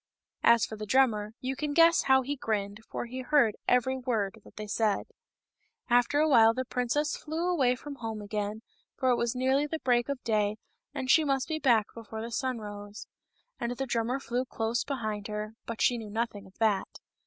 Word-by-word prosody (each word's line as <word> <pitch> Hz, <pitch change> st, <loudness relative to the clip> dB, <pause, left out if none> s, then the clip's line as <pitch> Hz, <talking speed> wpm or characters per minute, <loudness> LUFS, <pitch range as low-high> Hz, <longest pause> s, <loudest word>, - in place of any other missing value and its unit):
As 235 Hz, -1 st, +5 dB
for 220 Hz, -, -8 dB
the 215 Hz, 0 st, -6 dB
drummer, 220 Hz, -4 st, +2 dB
you 260 Hz, +1 st, -2 dB
can 290 Hz, +1 st, -3 dB
guess 335 Hz, 0 st, +6 dB
how 265 Hz, -1 st, +5 dB
he 285 Hz, +3 st, -2 dB
grinned, 215 Hz, -4 st, -3 dB
for -, -, -4 dB
he 255 Hz, +2 st, -6 dB
heard 255 Hz, -5 st, +3 dB
every 250 Hz, +1 st, +3 dB
word 220 Hz, -4 st, -2 dB
that -, -, -17 dB
they 215 Hz, -, -6 dB
said. 210 Hz, 0 st, 0 dB, 0.9 s
After 245 Hz, +4 st, +4 dB
a 310 Hz, -, +4 dB
while 225 Hz, -5 st, +6 dB
the 260 Hz, 0 st, -2 dB
princess 250 Hz, +5 st, 0 dB
flew 320 Hz, +3 st, -3 dB
away 270 Hz, -9 st, +2 dB
home 245 Hz, -5 st, -6 dB
again, 210 Hz, +1 st, -4 dB, 0.3 s
for 260 Hz, -1 st, +2 dB
it -, -, +4 dB
was 235 Hz, +1 st, -1 dB
nearly 265 Hz, +3 st, +2 dB
the 320 Hz, -, -3 dB
break 245 Hz, -3 st, +1 dB
of 280 Hz, -2 st, -2 dB
day, 210 Hz, -2 st, +1 dB, 0.3 s
and 260 Hz, -, -4 dB
she 320 Hz, -, +6 dB
must 275 Hz, -3 st, 0 dB
be 315 Hz, -1 st, -2 dB
back 235 Hz, -7 st, +4 dB
before 220 Hz, -1 st, -7 dB
the 235 Hz, -, -6 dB
sun 255 Hz, 0 st, -1 dB
rose. 205 Hz, -1 st, -8 dB, 0.5 s
And 235 Hz, +1 st, -2 dB
the 270 Hz, -, -1 dB
drummer 240 Hz, +1 st, -1 dB
flew 250 Hz, -1 st, -2 dB
close 235 Hz, -1 st, -2 dB
behind 215 Hz, -7 st, -3 dB
her, 210 Hz, 0 st, -4 dB
but 230 Hz, -1 st, -2 dB
she 245 Hz, -1 st, +3 dB
knew 220 Hz, -2 st, -8 dB
nothing 210 Hz, -2 st, -3 dB
of 190 Hz, -, -21 dB
that. 215 Hz, -4 st, 0 dB
235 Hz, 200 wpm, -29 LUFS, 215-265 Hz, 0.9 s, guess